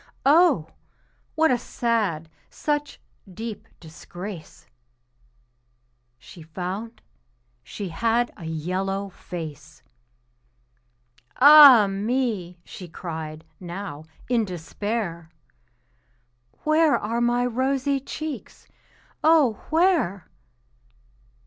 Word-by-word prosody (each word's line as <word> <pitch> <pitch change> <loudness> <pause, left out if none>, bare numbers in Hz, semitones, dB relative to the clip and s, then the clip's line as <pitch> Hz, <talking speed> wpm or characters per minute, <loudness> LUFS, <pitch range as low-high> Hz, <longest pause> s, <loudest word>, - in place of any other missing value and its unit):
Oh! 295 - +4 0.7
what 320 -1 +3
a 245 - +2
sad, 210 -12 -1 0.2
such 295 -1 -3 0.3
deep 220 +2 -7
disgrace! 175 +2 -10 1.5
She 165 +7 -14
found 185 +8 -6 0.6
she 195 - -7
had 230 +7 0
a 170 - -10
yellow 185 +5 -3
face. 155 -4 -9 1.5
"Ah, 280 -5 +9
me!" 200 -3 -2
she 180 - -10
cried, 160 -2 -7
now, 175 -4 -7 0.2
in 240 -2 +2
despair, 180 -1 -4 1.3
"Where 310 0 +3
are 230 +3 -2
my 240 +1 +2
rosy 265 +3 0
cheeks 285 -1 -7 0.6
oh, 305 -9 +3
where?" 320 - +1
210 Hz, 80 wpm, -24 LUFS, 175-255 Hz, 1.5 s, Ah